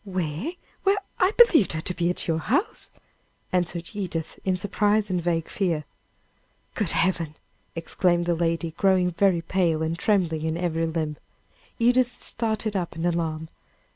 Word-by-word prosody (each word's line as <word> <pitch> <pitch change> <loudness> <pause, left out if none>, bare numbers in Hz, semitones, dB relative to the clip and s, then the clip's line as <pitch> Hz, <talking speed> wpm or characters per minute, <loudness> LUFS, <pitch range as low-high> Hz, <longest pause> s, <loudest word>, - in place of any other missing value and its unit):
"Where? 185 - -3 0.3
Why, 395 +1 +3 0.2
I 370 - +5
believed 340 - +6
her 155 - -2
to 180 - -2
be 175 -1 0
at 180 - 0
your 160 -1 +1
house!" 290 - 0 0.6
answered 175 -1 -1
Edith, 180 -6 -4
in 185 -1 +1
surprise 205 +2 +1
and 180 -1 0
vague 165 -1 0
fear. 170 -6 -1 0.9
"Good 210 -6 -1
heaven!" 165 -4 0 0.4
exclaimed 175 +1 +1
the 175 - +2
lady, 165 0 0
growing 185 +1 +2
very 175 -1 +2
pale, 165 -3 +1
and 160 +1 -1
trembling 175 -7 +2
in 160 +1 -1
every 165 -2 0
limb. 155 -2 -2 0.6
Edith 245 +1 +3
started 220 -2 -2
up 175 -4 -2
in 165 +1 -3
alarm. 160 -2 -1
175 Hz, 150 wpm, -25 LUFS, 165-200 Hz, 0.9 s, believed